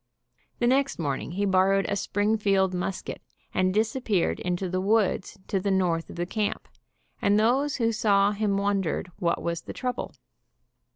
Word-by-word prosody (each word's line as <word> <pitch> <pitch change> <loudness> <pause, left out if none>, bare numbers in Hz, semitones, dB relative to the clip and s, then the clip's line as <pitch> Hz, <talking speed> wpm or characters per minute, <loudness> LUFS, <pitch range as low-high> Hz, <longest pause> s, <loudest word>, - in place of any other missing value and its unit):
The 240 - 0
next 270 +3 +2
morning 145 0 -3
he 200 +3 0
borrowed 195 0 +3
a 200 - 0
Springfield 200 -2 +1
musket 180 +1 -4 0.3
and 185 0 +2
disappeared 215 -2 0
in 180 0 -1
the 185 0 -2
woods 205 0 +1
to 195 - 0
the 200 +2 -1
north 180 -4 +1
of 175 0 -4
camp, 210 0 -2 0.5
and 205 +1 +3
those 265 +6 +2
who 230 -3 +1
saw 205 -2 +3
him 205 -1 0
wondered 195 -3 -1
what 170 -3 0
was 170 -1 -2
the - - -8
trouble. 250 -1 -4
200 Hz, 155 wpm, -26 LUFS, 185-215 Hz, 0.5 s, borrowed